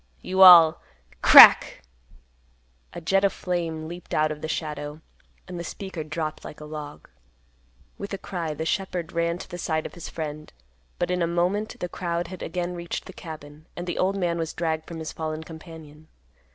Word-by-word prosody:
You 190 +1 -1
all—" 170 -3 +9 0.4
Crack! - - +8 1.1
A - - -7
jet 195 +4 +1
of 200 - +3
flame 165 -3 -4
leaped 175 +1 -7
out 155 0 +2
of 150 -1 -7
the - - -4
shadow, 150 -1 -5 0.5
and 180 -1 -7
the - - -5
speaker 185 -1 -7
dropped 155 0 -5
like - - -10
a 150 - -9
log. 150 -1 -9 0.9
With 200 - -6
a 195 - -3
cry 170 -5 -5
the 160 - -4
shepherd 180 -1 -3
ran 170 0 -1
to - - -10
the 175 - -8
side 155 -2 -2
of - - -7
his 175 - -9
friend; 155 -1 -7 0.5
but - - -2
in 180 0 -1
a 170 - +1
moment 180 +5 -1
the 180 - -3
crowd 170 -1 -4
had 185 -1 -9
again 175 +1 -4
reached 170 -1 -6
the - - -11
cabin, 155 -2 -11
and 175 - -6
the 175 - -4
old 195 +2 +1
man 170 -3 -1
was 165 -1 -3
dragged 160 -2 -3
from 170 - -8
his 160 -1 -6
fallen 155 0 -5
companion. 160 -1 -13
165 Hz, 190 wpm, -25 LUFS, 155-175 Hz, 1.1 s, all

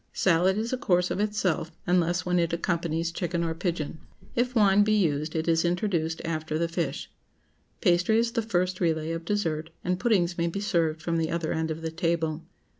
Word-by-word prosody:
Salad 185 +2 +3
is 225 +3 -2
a 255 - -1
course 180 -8 +2
of - - -2
itself, 200 -6 0
unless 175 -1 +1
when 180 0 +2
it 170 -1 +1
accompanies 170 -1 -1
chicken 170 0 -2
or 165 -1 -1
pigeon. 165 -2 -3 0.4
If 250 +1 0
wine 205 -2 +5
be 215 +1 +2
used, 155 -5 0
it 160 +1 -1
is 165 -1 +3
introduced 170 -2 -1
after 155 -1 -2
the 170 +1 +1
fish. 170 - -3 0.7
Pastry 180 +3 +3
is 230 0 +2
the 230 -1 0
first 185 -4 -1
relay 160 -2 0
of 165 0 -4
dessert, 165 -6 -1
and 180 0 0
puddings 185 -7 +1
may 170 - +2
be 170 +4 -3
served 165 -5 0
from 165 0 0
the 160 -1 0
other 165 -1 -1
end 160 0 -1
of 160 +1 -4
the 160 - -2
table. 165 -1 -1
170 Hz, 195 wpm, -27 LUFS, 165-190 Hz, 0.7 s, wine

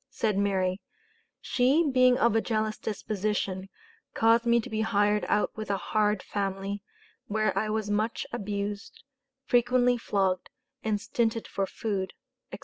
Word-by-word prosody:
Said 215 -3 0
Mary, 190 -1 0 0.6
"She 275 +6 +3
being 255 -2 +5
of 235 -3 +3
a 225 - +4
jealous 215 -1 -1
disposition, 200 -2 -2 0.5
caused 230 +1 +4
me 235 0 +5
to - - -8
be 220 0 -2
hired 210 -1 +2
out 210 - +1
with 215 -1 -6
a 200 - +1
hard 210 -1 0
family, 195 0 -3 0.5
where 215 0 0
I 215 +2 0
was 215 -1 -1
much 215 +2 0
abused, 205 -2 -4 0.4
frequently 245 0 +3
flogged, 195 -4 0 0.3
and 215 -2 0
stinted 230 +1 -1
for 195 -1 -2
food," 195 -3 -3 0.4
etc. - - -7
215 Hz, 140 wpm, -28 LUFS, 200-230 Hz, 0.6 s, being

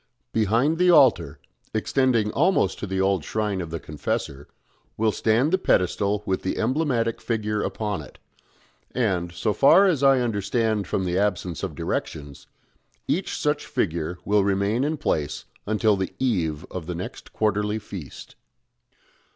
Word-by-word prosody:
Behind 115 - +2
the 180 0 +4
altar 130 - +4 0.4
extending 115 -1 +1
almost 180 - +2
to 105 - -4
the 95 0 -2
old 95 -3 +1
shrine 105 -1 -2
of 85 - -6
the 85 0 -4
Confessor 70 -2 -4 0.5
will 110 0 +2
stand 120 - +1
the 190 - +3
pedestal 100 - +1
with 95 - -1
the 95 - -2
emblematic 120 -3 0
figure 105 -2 -1
upon 105 -6 -3
it; 70 - -13 0.8
and 95 -8 0
so 105 +4 -1
far 170 - +6
as 170 -8 +2
I 135 -1 +5
understand 110 -2 0
from 95 - -1
the 90 +1 0
absence 90 -5 -1
of 95 -6 -4
directions 75 -3 -4 0.6
each 185 - -1
such 150 -1 -1
figure 85 -1 -2
will 105 0 +3
remain 100 +5 +1
in 155 +2 -1
place 75 - -2 0.2
until 110 0 +2
the 95 -1 -3
eve 90 - -1
of 90 -3 -6
the 90 - -3
next 90 - -7
quarterly 105 0 0
feast." 100 -8 -9
105 Hz, 150 wpm, -24 LUFS, 90-120 Hz, 0.8 s, far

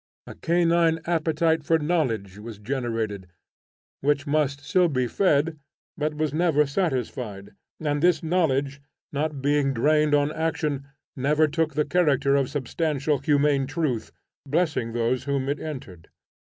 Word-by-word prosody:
A - - -9
canine 170 -1 +2
appetite 160 -1 +1
for 165 +2 +3
knowledge 130 - -1
was 110 0 -8
generated, 110 -4 -3 0.7
which 145 +1 +1
must 145 -1 0
still 180 -1 +3
be 130 -4 0
fed 155 - +1 0.4
but 150 0 -2
was 155 -2 -1
never 155 -2 +3
satisfied, 125 - -3 0.3
and 145 -2 -1
this 175 +1 +3
knowledge, 140 -5 0 0.3
not 145 -1 -2
being 145 -1 +2
directed 150 +4 +3
on 145 +1 +2
action, 155 -3 -2 0.3
never 150 +4 +2
took 160 +1 -1
the 150 -1 +1
character 145 -4 +2
of 135 -2 +1
substantial, 145 +1 -1
humane 140 -1 +2
truth, 145 -6 -2 0.3
blessing 145 -6 -1
those 120 +2 0
whom 140 -1 -1
it 145 +2 -1
entered. 105 - -8
145 Hz, 135 wpm, -25 LUFS, 135-160 Hz, 0.7 s, for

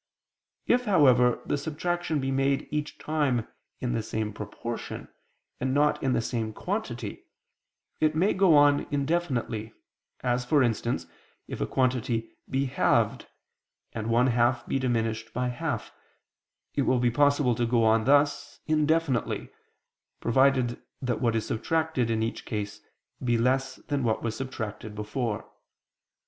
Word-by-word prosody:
If, 245 0 +2
however, 125 - +4
the 145 - -1
subtraction 160 +2 -2
be 135 0 -1
made 135 +1 +1
each 150 0 -3
time 140 -7 0 0.3
in 125 -1 -2
the 115 - 0
same 110 -1 -3
proportion, 105 +3 -6 0.5
and 130 +1 0
not 150 +1 +3
in 130 -1 +1
the 115 - +1
same 110 -2 -2
quantity, - - -4 0.7
it 155 0 +2
may 185 +6 +3
go 185 -4 +5
on 145 0 +4
indefinitely, 135 -7 -1 0.5
as, 125 0 +1
for 140 +2 +3
instance, 120 0 -1 0.4
if - - -6
a - - 0
quantity 125 -3 0 0.2
be 135 +1 +1
halved, 130 - +1 0.7
and 110 -1 -4
one 120 +2 +3
half 120 0 +2
be 135 - -1
diminished 115 -3 -1
by 125 0 0
half, 125 -3 -3 0.8
it 145 - +1
will 130 -1 +2
be 120 -1 +2
possible 145 -1 +3
to 120 +1 0
go 115 -1 +3
on 110 0 +3
thus 145 +1 +2
indefinitely, 155 -4 +1 0.7
provided 130 -1 +2 0.2
that 125 -3 -2
what 115 -3 +2
is 110 - 0
subtracted 160 0 0
in 110 -1 +1
each 115 - -3
case 105 -2 -4 0.4
be 120 -2 +2
less 130 +3 +1
than 145 -2 -3
what 110 -2 0
was 115 -1 -2
subtracted 110 -4 -5
before. 105 +1 -3
125 Hz, 140 wpm, -27 LUFS, 115-145 Hz, 0.8 s, go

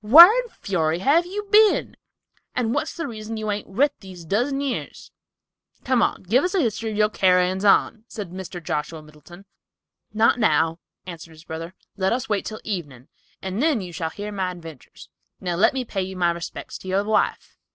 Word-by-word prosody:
"Whar 325 - +10
in - - -1
fury 165 - -1
have 300 - +3
you 410 +3 -5
been, 430 0 +4 0.6
and 235 -2 0
what's 305 +4 -2
the 330 - -3
reason 220 -2 -6
you 215 -1 -3
hain't 205 0 -3
writ 280 +9 +1
these 185 -4 -11
dozen 245 - 0
years? 280 -2 -5 0.7
Come, 255 -6 +1
give 245 +8 +3
us 360 - -1
the 390 - +2
history 225 -5 -1
of 210 - -5
your 210 0 +3
carryin's 185 0 +2
on," 215 +2 +3
said 205 -8 -7
Mr. 180 -1 -7
Joshua 155 +1 -3
Middleton. 155 +5 -15 0.7
"Not 225 +2 +3
now," 165 -7 +2 0.3
answered 170 -2 -9
his 155 0 -15
brother. 165 +3 -7 0.2
"Let 190 +1 +1
us 250 0 -2
wait 210 -3 -1
until 215 - -9
evening, 145 - -6 0.3
and 190 +4 -3
then 305 -5 +2
you 180 -3 -7
shall 165 -2 -3
hear 205 +5 -7
my 190 -2 -2
adventures; 165 - -11 0.3
now 180 -2 -2
let 185 - +4
me 260 -2 -3
pay 190 -3 -4
my 175 -2 +2
respects 170 0 -7
to - - -12
your 190 +2 +1
wife." 210 0 -1
200 Hz, 185 wpm, -23 LUFS, 175-240 Hz, 0.7 s, Whar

